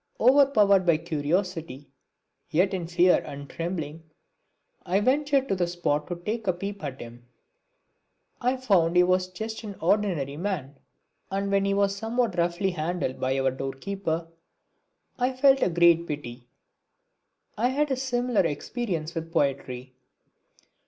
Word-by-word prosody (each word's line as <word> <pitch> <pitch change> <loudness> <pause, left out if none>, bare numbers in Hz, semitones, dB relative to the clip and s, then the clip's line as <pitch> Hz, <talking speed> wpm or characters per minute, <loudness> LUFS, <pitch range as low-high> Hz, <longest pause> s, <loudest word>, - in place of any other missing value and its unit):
Overpowered 235 -7 +5
by 170 -3 +3
curiosity, 160 -2 -3 0.6
yet 185 +5 +2
in 175 -3 -3
fear 175 +1 +4
and 140 0 -8
trembling, 165 -2 -5 0.7
I 185 +2 +1
ventured 275 +4 +2
to - - +2
the 180 -2 0
spot 170 -4 -1
to 175 - -3
take 210 +5 -4
a 185 - +3
peep 195 +2 -6
at 140 -2 -5
him. 120 +1 -11 1.1
I 250 +2 +1
found 185 -9 +2
he 180 - +7
was 185 0 +2
just 220 +5 -6
an 205 -2 -7
ordinary 170 -7 0
man! 150 -7 -4 0.5
And 200 +1 -2
when 195 0 +2
he 200 0 +1
was 200 0 +2
somewhat 225 0 -1
roughly 175 +3 +1
handled 165 -4 -3
by 130 +1 0
our 135 0 +2
door 135 +1 -4
keeper 170 +1 -3 0.9
I 250 +1 +1
felt 270 +1 +4
a - - +3
great 170 0 +4
pity. 125 -4 -6 1.1
I 235 +4 +1
had 285 +3 0
a - - +2
similar 245 -4 0
experience 165 - -3
with 165 -1 -5
poetry. 130 -5 -1
180 Hz, 145 wpm, -26 LUFS, 155-205 Hz, 1.1 s, he